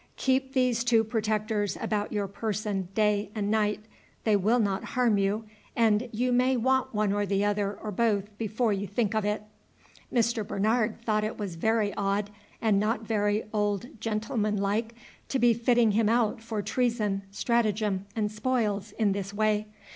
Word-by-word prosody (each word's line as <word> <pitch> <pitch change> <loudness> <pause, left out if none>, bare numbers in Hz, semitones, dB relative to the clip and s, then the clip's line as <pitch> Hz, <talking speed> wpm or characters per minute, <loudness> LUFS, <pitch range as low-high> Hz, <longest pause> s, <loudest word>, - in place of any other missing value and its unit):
Keep 265 0 +1
these 250 -3 +2
two 235 -2 +4
protectors 215 -2 -1
about 210 -1 -2
your 205 -2 -1
person 205 -2 -3
day 210 -1 +2
and 205 -1 -1
night; 210 -1 +1 0.4
they 215 -2 +3
will 210 +5 +3
not 200 -5 0
harm 240 -6 +1
you, 200 +3 0 0.3
and 225 +1 +2
you 245 +3 0
may 255 +1 +3
want 260 +2 +1
one 210 -1 +1
or 205 0 +1
the 200 0 +1
other 205 -1 0
or 210 - -6
both 205 -1 0
before 220 +1 0
you 200 +1 -3
think 215 +1 0
of 215 -1 +1
it." 210 0 -1 0.7
Mr. 235 -1 +1
Bernard 215 +3 0
thought 215 -1 +1
it 215 - -3
was 200 -4 -4
very 215 +4 +1
odd, 200 +1 -1 0.3
and 210 -3 +3
not 215 +3 0
very 210 -1 0
old 210 +2 0
gentlemanlike, 215 0 -1 0.3
to 270 - 0
be 240 -2 +5
fitting 235 -1 +3
him 215 +1 +2
out 230 0 +1
for 225 -2 -3
treason, 225 -6 0
stratagem, 210 -2 0
and 210 -2 0
spoils, 215 -3 -1
in 215 -3 +1
this 195 0 -3
way. 215 0 +1
215 Hz, 165 wpm, -28 LUFS, 205-230 Hz, 0.7 s, be